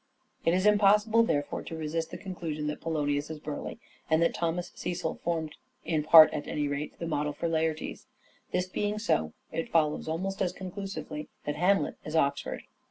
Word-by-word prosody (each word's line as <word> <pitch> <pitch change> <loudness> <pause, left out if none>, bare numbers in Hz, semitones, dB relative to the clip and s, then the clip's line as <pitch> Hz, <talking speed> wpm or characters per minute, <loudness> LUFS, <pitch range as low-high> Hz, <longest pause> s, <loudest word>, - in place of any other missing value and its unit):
Ophelia 165 - +3
It - - +3
is 185 - 0
impossible 210 +2 +5
therefore 145 -10 0
to 165 - -7
resist 160 +1 -2
the - - -6
conclusion 170 -6 -5
Oxford 150 - -9
y - - -1
t*13* 150 -1 0
P°l°nius 145 +1 0
is 160 -1 -6
Burleigh, 150 +5 -5 0.3
and 160 0 +4
that 170 - +3
Thomas 170 +1 -2
Cecil 175 -2 -3
formed, 160 -3 -2 0.3
in 160 -2 +1
part 155 +1 +9
at 145 - -4
any 150 -1 -1
rate, 145 +1 -4
the 170 - -4
model 150 -2 -1
for 160 - -2
Laertes. 160 -1 -2 0.4
This 180 0 0
being 205 +3 -1
so, 80 - 0 0.2
it 165 - -3
follows 155 -2 +1
almost 190 +5 -2
as 180 -2 +1
conclusively, 190 -5 -6 0.2
that 145 - -1
Hamlet 180 -4 +2
is 155 - -5
Oxford. 140 -3 0
165 Hz, 190 wpm, -29 LUFS, 150-185 Hz, 0.4 s, part